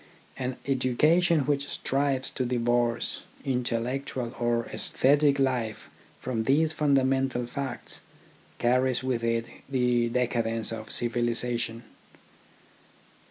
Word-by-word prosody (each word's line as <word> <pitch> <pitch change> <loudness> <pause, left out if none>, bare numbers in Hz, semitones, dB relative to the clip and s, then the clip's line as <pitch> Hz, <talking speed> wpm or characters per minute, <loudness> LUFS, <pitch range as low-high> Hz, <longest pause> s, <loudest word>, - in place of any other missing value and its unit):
An 125 0 -3
education 150 +6 +3
which 140 0 0
strives 135 -1 0
to 130 - -2
divorce 120 -1 0 0.2
intellectual 125 0 -2
or 120 -1 +1
aesthetic 145 +1 +3
life 125 -5 -1 0.3
from 115 -3 -2
these 155 +4 +3
fundamental 135 -4 +2
facts 130 0 -5 0.6
carries 125 +1 +2
with 125 -3 -1
it 115 0 +1 0.2
the 125 -3 +2
decadence 115 -2 -1
of 110 -1 -6
civilisation. 120 -1 0
125 Hz, 95 wpm, -27 LUFS, 120-135 Hz, 0.6 s, education